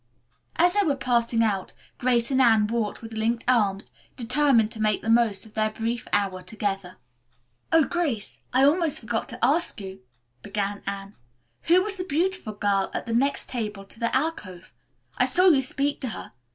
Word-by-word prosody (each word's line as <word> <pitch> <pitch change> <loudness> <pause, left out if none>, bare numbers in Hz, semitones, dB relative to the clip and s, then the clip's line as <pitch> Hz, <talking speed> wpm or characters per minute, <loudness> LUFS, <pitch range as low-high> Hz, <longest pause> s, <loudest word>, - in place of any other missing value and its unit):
As 355 +2 +4
they 410 - +3
were 295 -6 +1
passing 235 -3 +1
out, 200 -4 -1 0.3
Grace 245 0 +1
and 265 0 +3
Anne 225 -4 +5
walked 225 0 -3
with 225 0 -8
linked 225 +2 -1
arms, 205 -6 +1 0.2
determined 240 -2 +2
to 220 - -5
make 215 -1 +1
the 225 - +1
most 225 -4 +2
of 215 - -16
their 215 0 +1
brief 225 +2 -4
hour 195 -2 0
together. 195 -1 -4 0.7
"Oh, 325 -1 +5
Grace, 285 - -2
I 260 +2 +3
almost 320 +1 +3
forgot 225 0 -3
to - - -1
ask 300 0 +1
you," 190 -1 -8 0.4
began 200 +2 -3
Anne, 200 0 -5 0.5
"who 360 +2 +5
was 400 -1 +1
that 365 - -5
beautiful 340 - -1
girl 200 -1 0
at - - -3
the 230 - -3
next 275 +5 0
table 210 -5 -4
to 225 - -12
the 235 +2 0
alcove? 205 - -3 0.5
I - - +5
saw 365 +1 +5
you 285 -6 +4
speak 280 +2 -2
to 260 - -3
her. - - -8
230 Hz, 180 wpm, -25 LUFS, 205-280 Hz, 0.7 s, Anne